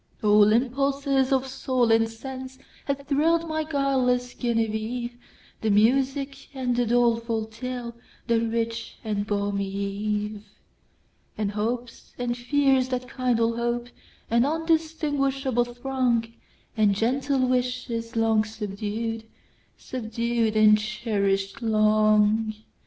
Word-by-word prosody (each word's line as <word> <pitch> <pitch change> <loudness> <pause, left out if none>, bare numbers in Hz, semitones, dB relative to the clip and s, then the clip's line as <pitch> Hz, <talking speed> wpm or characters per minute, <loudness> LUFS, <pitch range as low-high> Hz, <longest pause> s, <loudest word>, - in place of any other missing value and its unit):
All 210 0 +6
impulses 275 +3 +1
of 265 -1 +2
soul 255 -2 0
and 225 0 +4
senseHad 260 +3 -7
thrill'd 325 +4 +2
my 315 0 -1
guileless 265 -5 0
Genevieve; 235 +1 -2 0.5
The 220 - 0
music 270 +6 +1
and 250 -2 -1
the 240 -1 +1
doleful 230 -1 +1
tale, 235 +1 -6 0.3
The 235 -2 +2
rich 230 0 -2
and 210 -2 -2
balmy 200 -1 -1
eve; 205 +1 -3 1.0
And 210 -2 -1
hopes, 230 +3 -4
and 245 -1 -1
fears 265 +1 +2
that 250 -1 -4
kindle 230 -3 +1
hope, 240 0 -2 0.4
An 235 +1 +4
undistinguishable 290 -5 0
throng, 240 -2 -1 0.4
And 210 -3 +3
gentle 260 +4 +1
wishes 250 -2 -2
long 225 -1 +3
subdued, 215 +1 -4 0.5
Subdued 230 -2 -2
and 215 0 +6
cherish'd 210 0 -1
long! 215 0 +3
235 Hz, 105 wpm, -25 LUFS, 215-260 Hz, 1.0 s, All